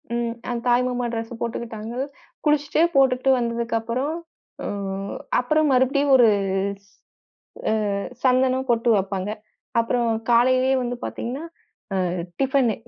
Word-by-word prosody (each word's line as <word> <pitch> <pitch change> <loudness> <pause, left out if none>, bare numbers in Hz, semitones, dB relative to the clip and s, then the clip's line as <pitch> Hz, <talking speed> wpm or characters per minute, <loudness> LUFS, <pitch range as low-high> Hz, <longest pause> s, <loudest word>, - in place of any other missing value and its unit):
ம். 235 -1 -1 0.2
அ - - 0
தாய் 245 +1 +4
மாமா 245 -1 -2
டிரஸ் 225 0 -5
போட்டுக்கிட்டாங்கள். 235 +2 -4 0.4
குளிச்சுட்டு 295 0 +2
போட்டுகிட்டு 265 -1 +4
வந்ததுக்கு 235 0 -1
அப்புறம் 255 +7 -2 0.5
ம் 195 -1 -4 0.2
அப்பறம் 305 +5 +2
மறுபடியும் 275 +2 +3
ஒரு 245 -3 +7 0.6
ஸ் 200 - -27 1.0
அ - - -1 0.3
சந்தனம், 260 0 +3
பொட்டு 235 0 +2
வப்பாங்க. 195 0 -2 0.5
அப்புறம் 235 +1 0 0.2
காலையிலே 255 +2 +4
வந்து 245 0 -3
பார்த்தீங்கன்னா, 260 +7 -4 0.5
அ - - +1 0.4
டிஃபன்னு 265 -4 +2
245 Hz, 115 wpm, -23 LUFS, 230-265 Hz, 1.0 s, ஒரு